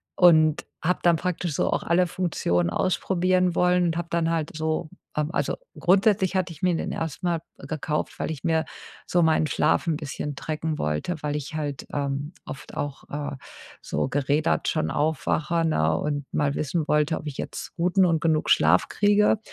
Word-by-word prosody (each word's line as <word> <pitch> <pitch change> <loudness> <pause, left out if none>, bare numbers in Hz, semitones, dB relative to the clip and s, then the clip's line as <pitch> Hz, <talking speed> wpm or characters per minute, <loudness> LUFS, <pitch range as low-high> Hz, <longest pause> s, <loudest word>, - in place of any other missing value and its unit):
und 155 -3 +5 0.2
habe 180 +3 +1
dann 170 -1 +5
praktisch 175 -1 -2
so - - +1
auch - - 0
alle 175 +1 +3
Funktionen 90 - 0
ausprobieren 185 - +1
wollen 180 0 +3
und 165 -1 0
habe 170 0 -3
dann 170 -1 +1
halt 160 -2 -2
so, 155 0 -2 0.3
ähm, 150 +1 0
also - - -1 0.2
grundsätzlich 190 +1 +3
hatte 180 -2 0
ich 150 - -17
mir 180 -1 +2
den - - -3
erst 160 +2 -4
mal 170 -2 +1 0.2
gekauft, 155 -1 -3
weil - - -2
ich 145 -4 -7
mir 160 -1 +1 0.4
so 175 -1 +3
meinen 160 -1 +3
Schlaf 150 - +1
'n 165 - +2
bisschen 145 -1 -5
tracken 155 +1 -3
wollte, 75 - -1
weil 150 0 -1
ich 150 +2 -6
halt, 145 -4 -4
ähm, 140 +2 -2
oft 135 - -9
auch, 145 -1 -4
äh, 145 -1 -4 0.5
so - - -1
gerädert 145 +3 +1
schon 155 - 0
aufwache, 160 +2 0
ne? 80 - +2
Und 145 -1 -2
mal 145 -1 +1
wissen 155 +1 -1
wollte, 150 +1 +2
ob - - -9
ich 145 - -6
jetzt - - -6
guten 180 +2 +3
und 165 -2 +2
genug 155 -1 +1
Schlaf 80 +4 +4
kriege. 205 +1 +3
160 Hz, 180 wpm, -25 LUFS, 145-175 Hz, 0.5 s, und